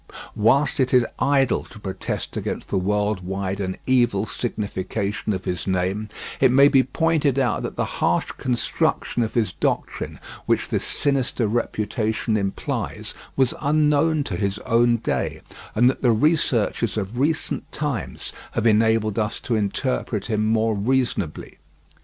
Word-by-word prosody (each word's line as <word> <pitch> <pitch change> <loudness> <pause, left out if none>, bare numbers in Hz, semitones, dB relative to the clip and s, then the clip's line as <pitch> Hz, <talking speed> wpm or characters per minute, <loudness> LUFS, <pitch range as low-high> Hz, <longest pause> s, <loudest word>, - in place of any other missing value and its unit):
Whilst 135 +7 +3
it 130 -1 +3
is 125 -1 +5
idle 140 -2 +2
to - - -14
protest 95 -2 -4
against - - -4
the 100 - 0
world 105 +1 0
wide 95 +1 -3
and 95 -1 -3
evil 120 -6 +2
signification 105 -1 -3
of 95 -2 -3
his 90 +1 -3
name, 95 +3 -1 0.3
it 130 -2 +5
may 140 +2 +7
be 135 - +5
pointed 150 0 +1
out 125 -5 +1
that - - -5
the - - 0
harsh - - 0
construction 120 -1 -1
of 110 - -2
his 115 -3 +1
doctrine - - -2 0.3
which - - +1
this - - 0
sinister 135 -5 0
reputation 110 0 -1
implies 100 -2 -3 0.2
was 130 -3 +2
unknown 150 +1 +3
to 90 -9 -4
his 100 +2 -1
own 120 +1 +3
day, 115 - -2 0.3
and 120 +3 +5
that 130 - +1
the 125 - +3
researches 115 - +1
of 105 +4 -3
recent 155 +4 -1
times 145 -6 -3 0.2
have - - -1
enabled 110 -1 +3
us 105 0 -1
to 120 - -2
interpret 110 0 -1
him 110 -2 0
more 110 0 +2
reasonably. 110 -6 -1
115 Hz, 145 wpm, -23 LUFS, 105-130 Hz, 0.3 s, may